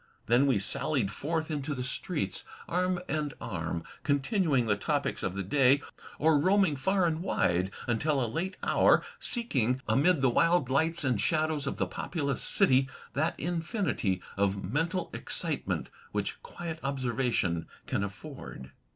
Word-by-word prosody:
Then 125 +4 +4
we 130 -6 +3
sallied 125 +1 0
forth 160 +6 -2
into 145 -1 -2
the 125 - -3
streets, 125 - -3 0.2
arm 180 +1 +1
and 150 -3 -2
arm, 85 -4 -3 0.2
con 145 -1 +2
tinuing 150 - +1
the 105 -2 +2
topics 100 - -1
of 95 -1 -2
the 100 - -2
day, 135 +7 +4 0.3
or 155 -1 +4
roaming 190 -1 +3
far 190 +6 +2
and 165 -1 0
wide 90 - +1 0.2
tmtil 135 +4 +1
a - - +1
late 165 - -3
hour, - - +4 0.2
seeking, 130 - 0
amid 140 +8 +3
the 135 - +4
wild 165 -2 +3
lights 160 +4 +1
and 125 -7 +1
shadows 155 +2 +1
of - - -2
the - - +1
populous 140 -6 -3
city, 135 -9 +4 0.2
that 155 +4 0
infinity 165 - -1
of 100 0 +1
mental 165 - -1
excitement - - -2 0.2
which - - -2
quiet 170 - -6
observation 125 -10 0 0.2
can - - -1
afford. 80 -8 -8
140 Hz, 150 wpm, -30 LUFS, 115-165 Hz, 0.3 s, Then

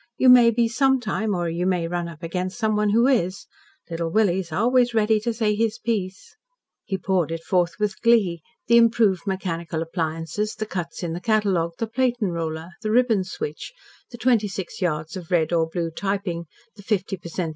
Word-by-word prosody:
You 260 - +5
may 245 -2 +8
be 230 0 +2
sometime, 245 -4 +1
or 175 -1 -1
you 170 +2 -1
may 180 -3 0
run 175 0 -3
up 170 0 -11
against 180 +3 -3
someone 215 -2 +1
who 230 +4 +4
is. 200 -9 +1 0.4
Little 165 -1 -3
Willie's 190 -3 +1
always 240 +6 +2
ready 220 0 +3
to 235 +3 -2
say 220 -2 0
his 225 +1 0
piece." 210 - -4 0.5
He 195 - -2
poured 185 -3 0
it 165 0 -4
forth 175 -2 +1
with 210 -2 -2
glee 205 -8 +3 0.2
the 235 +1 +5
improved 220 -5 +3
mechanical 170 -4 -3
appliances, 165 +5 -3
the 215 - -3
cuts 180 -4 -5
in 165 -2 -2
the 175 - -5
catalogue, 195 -7 +1
the 225 - -1
platen 240 -3 0
roller, 160 0 -4
the 215 - -2
ribbon 225 -3 +3
switch, 170 - -6 0.4
the 240 - -10
twenty 230 -3 +2
six 195 -2 -6
yards 155 -2 -2
of 180 -3 -8
red 170 -2 +1
or 165 -1 +2
blue 165 -1 -3
typing, 195 -2 -3 0.3
the 205 - -12
fifty 195 -2 -1
per 175 -2 -10
cent. 170 0 -3
190 Hz, 190 wpm, -23 LUFS, 170-220 Hz, 0.5 s, may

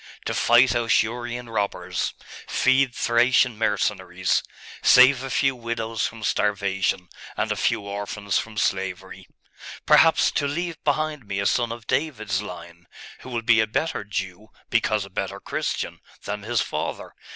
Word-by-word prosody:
To - - -1
fight 120 +2 +5
Ausurian 120 +1 0
robbers, 105 -3 -2 0.3
feed 130 -1 +2
Thracian 120 +1 +3
mercenaries, 105 -2 0 0.4
save 130 +1 +7
a 135 - -5
few 135 +1 +1
widows 115 -2 -2
from 115 -1 -10
starvation, 95 -3 0 0.3
and - - -1
a - - 0
few - - 0
orphans 100 0 -3
from 110 -1 -7
slavery.... 95 -1 -2 0.6
Perhaps 165 -1 +5
to 145 - 0
leave 165 +3 -4
behind 150 -4 -1
me 100 0 -3
a 100 - -1
son 120 +1 +1
of 115 -1 -8
David's 110 -11 -1
line, 85 -3 -10 0.3
who - - -11
will 120 -2 -3
be 115 -1 +4
a 110 - +3
better 155 +3 -2
Jew, 100 0 -5 0.2
because 105 -2 +1
a - - -13
better - - -4
Christian, - - -3 0.2
than 105 0 -4
his 115 +2 0
father.... - - -4
115 Hz, 145 wpm, -24 LUFS, 100-125 Hz, 0.6 s, save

